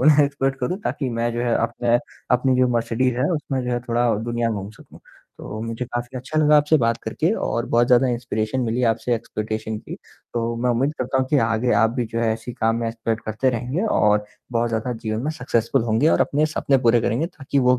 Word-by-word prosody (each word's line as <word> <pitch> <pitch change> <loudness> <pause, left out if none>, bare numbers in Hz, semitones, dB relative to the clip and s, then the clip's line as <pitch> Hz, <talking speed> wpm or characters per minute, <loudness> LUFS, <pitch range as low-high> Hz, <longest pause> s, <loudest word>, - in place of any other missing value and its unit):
उन्हें 150 -1 +6
एक्सपर्ट 135 -1 -1
करूँ 180 +10 -1
ताकि 135 - -2
मैं 115 0 -1
जो 120 - -2
है 120 -1 +2
अपना 120 0 +1 0.4
अपनी 130 +1 +1
जो 125 - +5
मर्सिडीज़ 120 +1 0
है 130 - +1
उसमें 140 -4 -2
जो 125 - -2
है 120 - +1
थोड़ा 120 -1 +2
दुनिया 120 -1 -1
घूम 100 -2 -4
सकूँ। - - -16 0.4
तो 110 - -7
मुझे 115 +2 -4
काफ़ी 120 +1 -5
अच्छा 145 +5 -3
लगा 150 0 +5
आपसे 150 +2 +4
बात 115 0 +2
करके 155 - 0 0.2
और 115 +1 -1
बहुत 120 +1 +4
ज़्यादा 125 +1 +5
इंस्पिरेशन 120 0 -2
मिली 120 +1 -1
आपसे 120 +2 -1
एक्सपीडिशन 110 -1 -4
की। - - -8 0.4
तो 115 0 -1
मैं 125 - +2
उम्मीद 135 +5 +1
करता 130 +1 0
हूँ 130 - +1
कि 145 - +4
आगे 115 +2 +1
आप 115 - +4
भी 120 - +1
जो 115 - -1
है 115 -1 +2
ऐसे 115 +2 -8
ही - - -8
काम 115 +1 +2
में 115 - -1
एक्सपेक्ट 115 -1 -3
करते 110 +5 0
रहेंगे 125 - -2 0.2
और 105 0 +3 0.3
बहुत 115 0 +1
ज़्यादा 115 +2 -1
जीवन 110 +1 -1
में 155 - 0
सक्सेसफुल 120 -6 0
होंगे 115 +7 +2
और - - +3
अपने 150 +2 +2
सपने 135 -1 +3
पूरे 115 0 +5
करेंगे 120 +8 0
ताकि 140 -5 -3
वो 125 -1 +4
120 Hz, 225 wpm, -22 LUFS, 115-130 Hz, 0.4 s, उन्हें